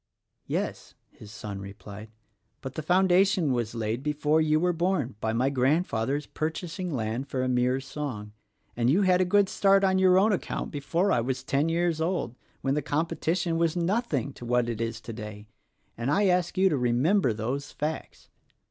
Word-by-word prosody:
"Yes," - - -3 0.2
his 105 - -14
son 105 -2 -7
replied, 100 +2 -10 0.5
"but 130 -1 -6
the 155 - -4
foundation 180 -1 +3
was 120 -2 -2
laid 115 +1 -2
before 150 +1 +1
you 155 0 +3
were 180 +1 +1
born 170 -7 0
by 110 - 0
my 125 +4 +1
Grandfather's 140 -1 0
purchasing 165 +3 -4
land 120 -1 -2
for 130 -2 -2
a - - 0
mere 125 +1 +1
song, 130 -6 -6 0.4
and 120 0 +1
you 185 +9 +4
had 185 -1 +4
a - - +3
good 200 +2 +3
start 195 0 +3
on 190 -1 +3
your 185 -1 +5
own 205 +3 +4
account 185 - -3
before 170 +7 0
I 120 - +3
was 130 +2 -3
ten 140 +4 +1
years 170 -1 0
old 170 -8 -1 0.2
— - - -37
when 135 - 0
the 150 - 0
com 150 +4 0
petition 170 0 -1
was 170 -1 +1
nothing 180 - -1
to - - -12
what 120 0 +1
it 115 -1 -3
is 115 -1 -3
today, 105 -2 -8 0.3
— - - -44
and 120 +3 -1
I 200 +7 +3
ask 180 -2 +1
you 190 +1 +5
to 150 - 0
remember 125 - +2
those 125 +7 -3
facts. 155 +2 -5
145 Hz, 190 wpm, -27 LUFS, 120-180 Hz, 0.5 s, your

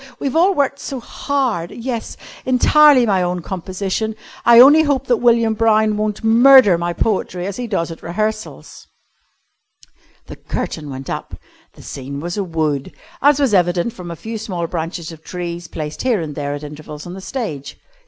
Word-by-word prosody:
We've 275 +1 -3
all 370 +4 +4
worked 280 -1 0
so 270 -1 -5
hard. 240 - -2
Yes, 235 -1 -5 0.3
entirely 265 +1 +5
my 195 -4 +2
own 180 -1 -2
composition. 190 +4 -3 0.3
I 235 0 +8
only 290 +5 +8
hope 285 -4 0
that 245 -2 +2
William 230 -1 +3
Brown 220 -1 +2
won't 210 0 -2
murder 235 -2 +7
my 170 +1 -2
poetry 180 -1 -2
as 200 0 -5
he 245 -1 -4
does 170 -6 -2
at 165 - -10
rehearsals." 215 +5 -5 1.4
The - - -10
curtain 150 -3 -5
went 135 0 -7
up. - - -5 0.4
The - - -15
scene 140 +1 -7
was 175 +3 -4
a 205 - -1
wood, 155 -5 -2 0.3
as 290 0 +4
was 270 -6 +2
evident 175 +3 +1
from 180 -2 -9
a 170 - -5
few 220 +6 -6
small 185 -6 -4
branches 165 0 -5
of 160 -1 -13
trees 175 -1 -6
placed 155 -1 -6
here 245 -5 +1
and 155 -3 -5
there 145 0 -3
at 145 - -8
intervals 150 0 -9
on 175 - -8
the 190 - -8
stage. 160 - -5
200 Hz, 175 wpm, -18 LUFS, 170-240 Hz, 1.4 s, I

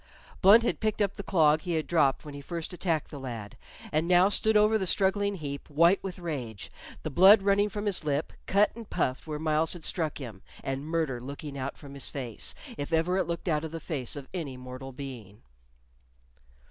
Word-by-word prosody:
Blunt 205 +4 +8
had - - 0
picked 215 -1 -1
up 200 -2 +1
the - - -5
clog 155 -6 +3
he 175 - -3
had 160 -1 0
dropped 150 -6 +2
when 150 - -8
he 140 - -7
first 170 +3 -5
attacked 170 -3 -1
the 145 - -7
lad, 115 -6 -6 0.4
and 155 +2 +1
now 180 +2 +6
stood 220 +1 +3
over 210 +1 +4
the 190 - -1
struggling 200 +2 +1
heap, 140 -5 -6
white 170 +6 +4
with 190 -2 -5
rage, 135 - -5 0.3
the 155 - -3
blood 195 +6 +7
running 200 +1 +3
from 205 +1 -4
his 200 -5 0
lip, 145 0 -1
cut 200 +2 +3
and 230 -2 -10
puffed 130 +4 -1
where 150 -1 -3
Myles 155 +1 +1
had 175 -3 -8
struck 160 -4 -2
him, 115 -9 -8 0.2
and 135 +2 -3
murder 160 -7 -1
looking 140 +2 -7
out 140 0 -4
from 140 -2 -11
his 140 - -3
face, 125 -6 -3 0.2
if 145 - -4
ever 165 +3 +2
it - - 0
looked 170 +2 -4
out 155 -2 +1
of 160 - -4
the 165 +1 -6
face 145 -7 -4
of 140 -2 -7
any 150 -8 -4
mortal 130 +1 -8
being. 125 - -9
160 Hz, 210 wpm, -29 LUFS, 140-185 Hz, 0.4 s, Blunt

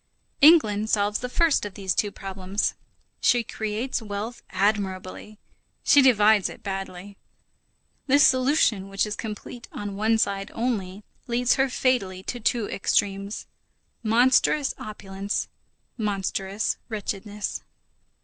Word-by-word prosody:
England 220 -9 +6
solves 205 -1 +1
the 250 - -4
first 330 +3 +2
of 205 -2 -6
these 190 -2 -1
two 205 - 0
problems. 195 0 -3 0.5
She 240 -1 +3
creates 220 +4 -3
wealth 215 +3 -5
admirably, 195 +1 -2 0.5
she 285 - +6
divides 215 -5 +5
it - - -12
badly. 195 0 -6 0.9
This 285 +2 +6
solution 255 -7 +2
which 195 +1 0
is 210 0 -4
complete 220 +3 -7
on 205 -1 -5
one 220 +2 +2
side 195 -2 -1
only 210 -5 -2 0.2
leads 245 +1 +2
her 270 0 +2
fatally 200 -8 0
to 245 - -4
two 230 -1 0
extremes: 200 +1 -1 0.6
monstrous 245 +5 +3
opulence, 200 -1 -4 0.5
monstrous 200 -1 -1
wretchedness. 210 -1 -4
210 Hz, 115 wpm, -25 LUFS, 195-240 Hz, 0.9 s, England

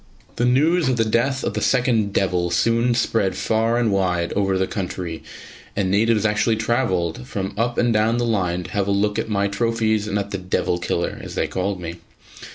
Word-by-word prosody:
The 120 - +2
news 150 +5 +3
of 130 - +1
the 115 - +2
death 125 +5 0
of - - -1
the - - -2
second 120 -5 +2
"devil" 90 -3 0
soon 115 +6 +2
spread 110 -5 +1
far 115 +1 +1
and 120 -3 +1
wide 90 -3 0
over 95 -1 +1
the 95 - +1
country, 90 -4 -5 0.5
and 95 -2 0
natives 110 +1 +2
actually 105 +2 +2
travelled 95 - -1
from 95 -1 -4
up 120 +3 -1
and 120 -1 +2
down 110 +2 +2
the 120 - 0
line 90 -6 0
to - - -10
have 100 -1 -1
a - - +1
look 105 +1 +1
at - - -3
my 100 -1 +1
trophies 110 0 0
and 105 - -1
at 100 0 -3
the 100 - -3
"devil 90 -1 -1
killer", 85 0 -2
as - - -8
they - - +1
called 95 +1 -2
me. 85 -1 -6
105 Hz, 205 wpm, -22 LUFS, 95-115 Hz, 0.5 s, news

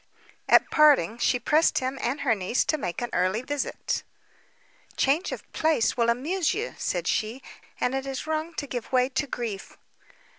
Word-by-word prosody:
At - - +5
parting 275 - +4
she 250 - +2
pressed 305 +7 +3
him 260 +1 -2
and 265 +5 -1
her 250 -5 +3
niece 200 +3 0
to 310 - +1
make 175 -4 -4
her - - 0
an - - -12
early 185 +6 +1
visit. 285 +1 -3 1.0
"Change 295 +7 +2
of - - -6
place 315 -7 +2
will 235 -1 +2
amuse 305 +9 0
you," 450 +4 -3
said - - -2
she, 230 +4 -1 0.4
"and 250 - 0
it 270 0 -2
is 270 0 -4
wrong 315 +1 -3
to 290 - -3
give 245 -4 -6
way 255 0 +3
to 285 +2 -2
grief." 230 -6 -5
260 Hz, 180 wpm, -26 LUFS, 235-300 Hz, 1.0 s, At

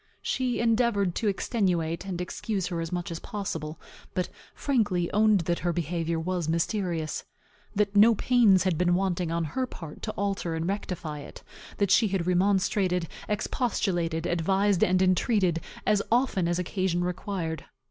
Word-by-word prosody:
She 255 -2 0
endeavored 230 -5 +2
to 220 - -1
extenuate, 185 -5 0
and 180 -2 -3
excuse 190 +2 -3
her 170 -2 -2
as 165 - -4
much 175 0 -3
as 165 - -4
possible; 165 -6 -5 0.4
but 180 -1 -1 0.3
frankly 205 -11 0
owned 210 -1 +4
that 170 +1 -1
her 175 - 0
behavior 170 0 -1
was 175 -1 -2
mysterious; 170 -2 -1 0.5
that 205 0 +1
no 220 +3 +7
pains 215 -7 +4
had 180 -4 0
been 175 0 +3
wanting, 180 -2 0
on 170 0 0
her 255 - -2
part, 165 -9 -9
to 215 - -3
alter 195 -4 -2
and 160 +1 -2
rectify 180 -6 -3
it; 145 - -11 0.3
that 200 -2 +1
she 220 +2 +5
had 190 -3 -1
remonstrated, 185 -1 +2 0.2
expostulated, 175 -7 -1
advised 190 +3 +2
and 185 +1 +3
entreated, 185 -2 +2 0.2
as 210 -1 +3
often 235 -7 +2
as 175 0 0
occasion 180 -1 -1
required. 175 -3 -3
185 Hz, 155 wpm, -27 LUFS, 170-205 Hz, 0.5 s, no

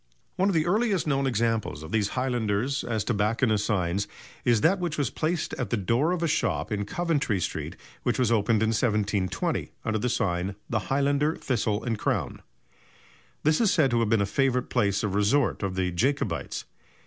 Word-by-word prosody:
One 190 +2 +2
of 195 - 0
the 155 -1 +2
earliest 205 0 +1
known 135 -2 +1
examples 115 - -1
of 80 - -9
these 110 -2 +2
highlanders 125 0 0
as 110 -3 -1
tobacconists' 110 0 +1
signs 95 0 0 0.4
is 120 -3 +3
that 185 +4 +3
which 170 -3 -2
was 140 -6 0
placed 160 +1 -1
at 130 - -2
the 120 - 0
door 115 - +1
of 180 -2 -1
a - - +2
shop 160 -5 0
in 105 -1 -1
Coventry 150 - 0
Street - - -3 0.3
which - - 0
was 125 -3 +2
opened 110 0 +2
in 110 - +2
1720 105 -5 0
under 110 0 0
the 125 - 0
sign 90 -6 0
of 100 - -8 0.2
"The 110 - +2
Highlander, 145 +3 +2
Thistle 110 -4 -1
and 115 -4 -2
Crown." - - -1 1.0
This 155 +5 +3
is 220 - +4
said 140 -6 +3
to 120 - +2
have 115 -2 +1
been 115 -2 +3
a - - +2
favourite 125 +3 0
place 100 -5 +1
of 105 -3 -1
resort 105 +7 +2
of 95 -2 -2
the 90 -1 0
Jacobites. 135 +11 -1
115 Hz, 190 wpm, -27 LUFS, 105-140 Hz, 1.0 s, is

